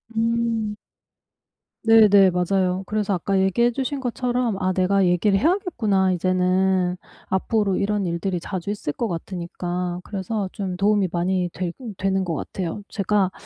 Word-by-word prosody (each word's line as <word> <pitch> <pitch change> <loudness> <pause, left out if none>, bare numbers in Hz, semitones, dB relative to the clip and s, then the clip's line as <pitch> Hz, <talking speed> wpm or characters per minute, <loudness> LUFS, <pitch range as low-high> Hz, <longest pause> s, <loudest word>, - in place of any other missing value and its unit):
음. 225 -2 0 1.1
네네, 205 -4 +6
맞아요. 180 +1 0
그래서 210 0 -1
아까 190 +2 0
얘기해 195 +6 +2
주신 270 +3 -3
것처럼 245 -3 -1
'아, 185 0 +1
내가 190 +1 +2
얘기를 180 +3 +2
해야겠구나 220 - +1
이제는 185 0 +1 0.3
앞으로 195 +1 +1
이런 205 0 0
일들이 175 +1 -2
자주 185 +2 -4
있을 205 -8 -3
것 235 - -2
같으니까.' 175 0 -4
그래서 200 0 -3
좀 190 -3 -4
도움이 200 +1 +2
많이 180 +1 0
되 180 -1 -3 0.3
되는 190 0 0
것 170 - -2
같아요. 180 +5 -4
제가 200 -2 +1
190 Hz, 305 characters per minute, -23 LUFS, 180-210 Hz, 1.1 s, 네네